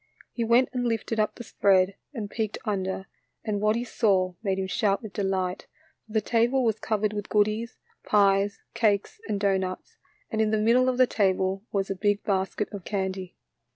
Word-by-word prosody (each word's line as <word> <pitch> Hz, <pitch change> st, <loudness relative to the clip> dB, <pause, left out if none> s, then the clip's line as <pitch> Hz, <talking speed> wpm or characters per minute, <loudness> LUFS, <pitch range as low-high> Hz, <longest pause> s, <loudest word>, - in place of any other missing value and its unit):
He 235 Hz, -, -2 dB
went 235 Hz, +3 st, +4 dB
and 245 Hz, -1 st, 0 dB
lifted 225 Hz, -1 st, -1 dB
up 215 Hz, -, +1 dB
the 240 Hz, -, -8 dB
spread 195 Hz, -3 st, +3 dB, 0.2 s
and 225 Hz, -8 st, -5 dB
peeked 215 Hz, 0 st, -3 dB
under, 190 Hz, -2 st, -2 dB, 0.4 s
and 205 Hz, -2 st, -1 dB
what 215 Hz, +1 st, +3 dB
he 235 Hz, -, -1 dB
saw 195 Hz, -6 st, +1 dB
made 195 Hz, -3 st, -1 dB
him 190 Hz, -, -1 dB
shout 195 Hz, +2 st, 0 dB
with 215 Hz, -3 st, -8 dB
delight, 190 Hz, -1 st, -2 dB, 0.4 s
for 215 Hz, -, -13 dB
the 220 Hz, -, +2 dB
table 240 Hz, +4 st, +2 dB
was 225 Hz, -2 st, +1 dB
covered 215 Hz, -1 st, 0 dB
with 205 Hz, -1 st, -5 dB
goodies, 215 Hz, +2 st, +1 dB, 0.3 s
pies, 200 Hz, -1 st, +3 dB
cakes, 225 Hz, -, +1 dB
and 205 Hz, -, -1 dB
doughnuts, 190 Hz, -2 st, -1 dB, 0.3 s
and 220 Hz, -1 st, 0 dB
in 215 Hz, -, +2 dB
the 215 Hz, -, +2 dB
middle 240 Hz, +4 st, +4 dB
of 250 Hz, -, -1 dB
the 255 Hz, -, +6 dB
table 190 Hz, -3 st, +1 dB
was 195 Hz, -1 st, -1 dB
a -, -, -1 dB
big 205 Hz, +1 st, 0 dB
basket 195 Hz, +1 st, -1 dB
of 200 Hz, -3 st, -6 dB
candy. 190 Hz, -2 st, -3 dB
205 Hz, 190 wpm, -26 LUFS, 195-225 Hz, 0.4 s, the